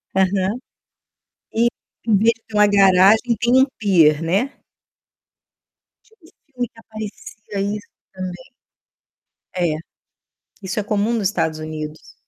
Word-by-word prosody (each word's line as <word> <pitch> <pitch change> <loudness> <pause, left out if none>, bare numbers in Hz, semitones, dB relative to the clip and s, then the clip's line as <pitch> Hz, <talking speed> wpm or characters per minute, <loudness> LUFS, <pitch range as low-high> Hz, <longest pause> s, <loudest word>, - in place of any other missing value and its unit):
Aham. 190 +3 +1 1.0
E 230 +1 +3 0.4
em 220 - +4
vez 225 +4 +4
de 225 - -28
ter 215 - -9
uma 210 0 +6
garagem 200 +4 +5
tem 245 +2 +4
um - - +6
píer, 165 -7 +4
né. 195 +12 0 1.5
Tinha 445 - -28
um 325 - -19 0.2
filme 250 -2 -3
que 225 - -19
aparecia 215 -2 -6
isso 210 - -13 0.3
também. 185 +7 -7 1.1
É, 175 -4 +1 0.9
isso 195 +3 -3
é - - -1
comum 210 +2 0
nos 215 -4 +1
Estados 160 -6 -1
Unidos. 155 0 -7
205 Hz, 125 wpm, -20 LUFS, 185-225 Hz, 1.5 s, uma